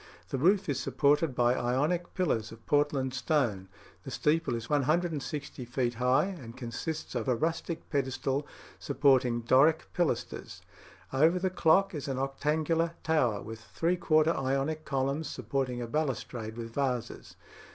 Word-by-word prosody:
The 135 - -2
roof 190 +6 +3
is 140 -3 -1
supported 145 0 +2
by 120 0 +3
Ionic 145 +9 0
pillars 115 - 0
of 115 0 -13
Portland 145 -3 +1
stone. 125 -8 0 0.3
The - - -8
steeple 155 -3 +1
is 115 0 -5
160 150 -1 -1
feet 120 0 -1
high, 125 +6 +2
and 135 -12 -8
consists 130 +6 -5
of 120 -1 -2
a 125 - +3
rustic 165 +5 -2
pedestal 135 0 -1 0.3
supporting 130 -4 +2
Doric 135 +7 +3
pilasters; 150 -9 -2 0.5
over 160 +6 +4
the 185 0 0
clock 185 +3 +3
is 150 -3 -5
an 135 -2 -2
octangular 155 +5 0
tower, 125 -10 +1
with 110 0 -8
three 165 - -1
quarter 160 -1 +3
Ionic 135 +4 -1
columns 140 +3 -1
supporting 125 0 -2
a - - -5
balustrade 120 -5 -3
with 115 -1 -6
vases. 125 -4 -3
135 Hz, 140 wpm, -30 LUFS, 125-160 Hz, 0.5 s, over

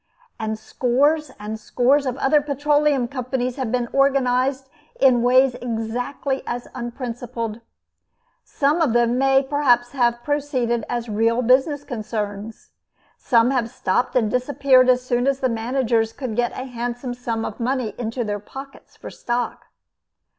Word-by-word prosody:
And 220 -1 -2
scores 275 +7 +1
and 215 +1 -5
scores 260 +5 +2
of 255 0 -2
other 285 +2 +3
Petroleum 290 -2 +1
Companies 255 -1 -3
have 255 -5 -2
been 245 -1 0
organized 270 -1 +2 0.3
in 255 -3 +5
ways 255 +2 +4
exactly 245 +3 -3
as 240 0 -4
unprincipled. 240 -2 -5 0.8
Some 295 +4 0
of 285 -8 +2
them 240 +1 +2
may 270 0 +4
perhaps 260 -4 +2
have 240 -3 +1
proceeded 260 -6 -1
as 240 -1 -2
real 230 +3 +1
business 270 +4 +3
concerns. 215 -3 -5 0.5
Some 235 0 +3
have 245 -4 0
stopped 245 0 -1
and 220 -4 +2
disappeared 255 0 +3
as 250 0 +3
soon 245 +1 0
as 275 -1 +1
the 260 - +1
managers 230 -1 0
could 250 -6 -5
get 240 0 +1
a 255 - -5
handsome 245 0 -4
sum 230 -2 -3
of 215 - -6
money 250 -2 -1
into 240 +1 -2
their 205 -1 -3
pockets 270 +6 -11
for - - -9
stock. 240 0 -3
245 Hz, 145 wpm, -22 LUFS, 235-270 Hz, 0.8 s, in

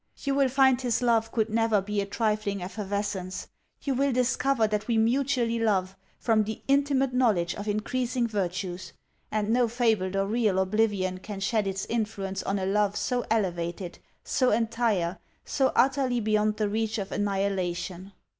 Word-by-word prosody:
You 280 - 0
will 275 -1 +3
find 265 -1 +4
his 245 -1 0
love 225 -2 +2
could 220 -3 +1
never 225 -1 +3
be 205 +1 -2
a 200 - -4
trifling 210 -2 -1
effervescence; 200 -1 -4 0.3
you 275 - 0
will 275 +2 +1
discover 250 0 +2
that 210 -1 -2
we 235 -2 +1
mutually 240 0 +1
love, 195 -4 +1 0.2
from 220 -2 +2
the 215 +1 -6
intimate 275 -1 +2
knowledge 210 -9 +2
of 205 - -7
increasing 240 +4 -1
virtues; 185 -3 -3 0.4
and 210 -1 -1
no 240 +1 +3
fabled 220 -5 +1
or 195 0 +1
real 215 -2 +1
oblivion 190 -1 +1
can 200 +1 -7
shed 210 +1 0
its 195 0 -2
influence 205 -4 -2
on 195 - -1
a 190 - -2
love 205 +1 +1
so 250 -1 -1
elevated, 175 -4 -2 0.2
so 255 -2 +1
entire, 220 -5 0 0.3
so 265 -2 +1
utterly 260 -1 +2
beyond 215 -1 +1
the 215 - +1
reach 220 +1 -1
of 200 -2 -4
annihilation. 190 -2 -2
215 Hz, 160 wpm, -27 LUFS, 195-240 Hz, 0.4 s, find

